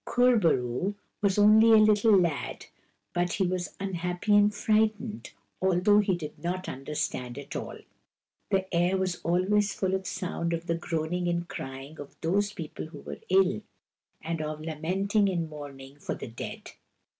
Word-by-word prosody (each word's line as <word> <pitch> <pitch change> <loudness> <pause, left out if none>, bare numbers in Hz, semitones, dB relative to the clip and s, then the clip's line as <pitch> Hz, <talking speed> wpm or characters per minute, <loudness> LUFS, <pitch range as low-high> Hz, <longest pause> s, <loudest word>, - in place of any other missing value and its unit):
Kur 245 0 +4
bo 170 -5 +4
roo 125 +11 -1 0.3
was 200 -1 +2
only 215 +2 +7
a - - +9
little 215 0 +6
lad, 170 -6 -1 0.5
but 175 0 0
he 195 - +1
was 180 0 -2
un 195 -1 -3
happy 180 +4 0
and 205 0 +5
frightened, 215 +1 0 0.3
although 190 +3 +4
he 195 -3 +2
did 155 -3 -7
not 185 +2 -2
under 135 +3 -6
stand 125 -4 -2
at 140 - -8
all. - - -5 0.7
The 190 -1 +1
air 175 +3 +2
was 185 -1 -1
always 195 +4 +2
full 190 -1 -1
of 190 - +1
the - - -3
sound 175 -3 -2
of 165 0 -3
the 170 - 0
groaning 170 +1 -2
and 170 0 -1
crying 135 +2 -7
of 145 - -9
those 200 +5 +1
people 160 -4 -7
who 160 - -11
were - - -8
ill, 190 +2 +3 0.6
and 165 0 -2
of 155 0 -4
lamenting 190 +6 0
and 170 -3 -1
mourning 140 -2 -10
for - - -4
the - - -7
dead. 115 - -7
180 Hz, 175 wpm, -28 LUFS, 160-205 Hz, 0.7 s, a